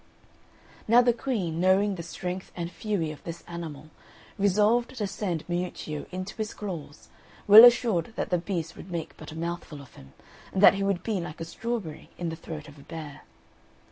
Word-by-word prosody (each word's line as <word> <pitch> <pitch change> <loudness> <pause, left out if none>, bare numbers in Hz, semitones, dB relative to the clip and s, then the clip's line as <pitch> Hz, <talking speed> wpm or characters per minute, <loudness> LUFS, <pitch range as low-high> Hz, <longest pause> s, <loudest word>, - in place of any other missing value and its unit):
Now 240 +3 +6
the 240 -1 +4
Queen, 205 -10 -2
knowing 190 +3 +3
the 180 - -5
strength 180 +2 -5
and 170 -1 -4
fury 175 -3 -2
of 155 - -11
this 170 0 -7
animal, 155 -3 -7 0.4
resolved 210 +5 +2
to 210 - -1
send 190 -4 -3
Miuccio 175 -4 -4
into 185 +1 -5
his 215 -1 -4
claws, 165 -7 -7 0.4
well 210 +3 +11
assured 230 -6 +5
that - - -3
the 180 - +3
beast 170 -3 -4
would 190 - -11
make 170 -3 -5
but - - -10
a - - -9
mouthful 170 -2 -5
of 140 -2 -14
him, 65 0 -15 0.4
and 190 - 0
that - - +10
he 195 - -3
would 195 -3 0
be 210 -5 -1
like 170 -1 -7
a 165 - -4
strawberry 210 -3 -5
in 175 -1 -2
the 165 - -4
throat 155 -2 -8
of 145 0 -14
a - - -12
bear. 155 -2 -8
180 Hz, 190 wpm, -27 LUFS, 160-205 Hz, 0.4 s, well